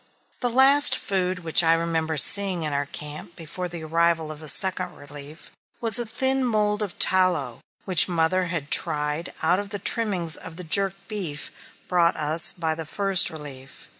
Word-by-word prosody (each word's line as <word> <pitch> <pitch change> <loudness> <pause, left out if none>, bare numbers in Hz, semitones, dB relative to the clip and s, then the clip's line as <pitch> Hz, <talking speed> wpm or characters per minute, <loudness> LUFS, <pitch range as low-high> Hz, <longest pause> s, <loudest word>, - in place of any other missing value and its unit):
The 245 - -2
last 270 +4 +5
food 185 -2 -3
which 160 0 +3
I 165 -1 +3
remember 165 -1 -3
seeing 185 +3 +4
in 150 -2 -3
our 140 0 -3
camp 150 +4 -8
before 170 +2 -7
the 170 -2 -9
arrival 165 0 -1
of 150 - -10
the 155 -1 -4
Second 185 0 +1
Relief 145 +2 -11 0.3
was 230 0 0
a 240 - -4
thin 265 +3 -1
mould 210 -3 -1
of 205 -4 -5
tallow, 180 -10 +1 0.3
which 185 -2 +4
mother 175 +2 0
had 170 -4 -5
tried 150 +3 0
out 175 +4 +1
of 205 0 -7
the 205 - -5
trimmings 195 -6 +1
of 165 -2 -10
the 180 - -6
jerked 195 +3 +1
beef 180 -9 -5 0.4
brought 175 -2 +1
us 155 +2 +4
by 160 -2 -3
the 160 -1 -7
First 195 0 +2
Relief. 140 -4 -11
170 Hz, 175 wpm, -23 LUFS, 155-195 Hz, 0.4 s, last